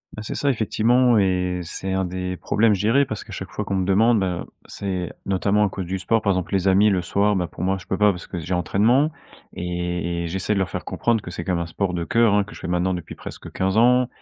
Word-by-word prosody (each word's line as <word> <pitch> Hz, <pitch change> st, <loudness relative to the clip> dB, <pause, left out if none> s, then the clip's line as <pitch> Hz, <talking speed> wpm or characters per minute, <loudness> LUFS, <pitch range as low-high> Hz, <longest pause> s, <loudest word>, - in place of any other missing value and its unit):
Bah, 105 Hz, -, -6 dB
c'est 105 Hz, -, -5 dB
ça, 140 Hz, -1 st, +1 dB
effectivement 120 Hz, +1 st, +3 dB
et 90 Hz, -2 st, +1 dB
c'est 95 Hz, +3 st, -5 dB
un 95 Hz, 0 st, 0 dB
des 90 Hz, 0 st, -4 dB
problèmes, 110 Hz, -1 st, +2 dB
je 95 Hz, -, -3 dB
dirais. 120 Hz, +7 st, +4 dB
Parce 110 Hz, -, -5 dB
qu'à -, -, -14 dB
chaque -, -, -6 dB
fois -, -, -4 dB
qu'on 100 Hz, -, -3 dB
me 95 Hz, -1 st, 0 dB
demande, 110 Hz, +4 st, +4 dB
ben, 90 Hz, -3 st, -2 dB, 0.2 s
c'est 95 Hz, -3 st, -4 dB
notamment 100 Hz, +2 st, +2 dB
à -, -, 0 dB
cause 95 Hz, -2 st, -5 dB
du 95 Hz, +1 st, -2 dB
sport. 115 Hz, +4 st, +1 dB
Par 100 Hz, -, +2 dB
exemple 90 Hz, +1 st, -3 dB
les 95 Hz, 0 st, +1 dB
amis 100 Hz, +2 st, +5 dB
le 90 Hz, -2 st, +1 dB
soir, 100 Hz, +3 st, +1 dB
ben, 90 Hz, -2 st, 0 dB
pour -, -, -7 dB
moi, 95 Hz, +1 st, +1 dB
je -, -, -16 dB
peux 95 Hz, -, -1 dB
pas 105 Hz, -1 st, +5 dB
parce 90 Hz, -, -8 dB
que 90 Hz, -, -5 dB
j'ai 85 Hz, +3 st, -4 dB
entraînement 115 Hz, -, +2 dB, 0.4 s
et 90 Hz, -1 st, -3 dB
et -, -, -3 dB
j'essaie 95 Hz, +4 st, -1 dB
de 100 Hz, -, 0 dB
leur 95 Hz, -, 0 dB
faire -, -, -5 dB
comprendre 115 Hz, -2 st, 0 dB
que 90 Hz, -, -8 dB
c'est -, -, -5 dB
quand 95 Hz, -, -1 dB
même 85 Hz, -1 st, 0 dB
un -, -, -6 dB
sport 90 Hz, +3 st, -2 dB
de 85 Hz, -, -2 dB
cœur, 115 Hz, +1 st, +3 dB
hein, 100 Hz, -, +3 dB
que 105 Hz, -, -12 dB
je -, -, -11 dB
fais -, -, -6 dB
maintenant 90 Hz, +1 st, 0 dB
depuis 85 Hz, -, -6 dB
presque -, -, -9 dB
15 95 Hz, +3 st, 0 dB
ans. 125 Hz, +1 st, +5 dB
95 Hz, 275 wpm, -23 LUFS, 90-105 Hz, 0.4 s, amis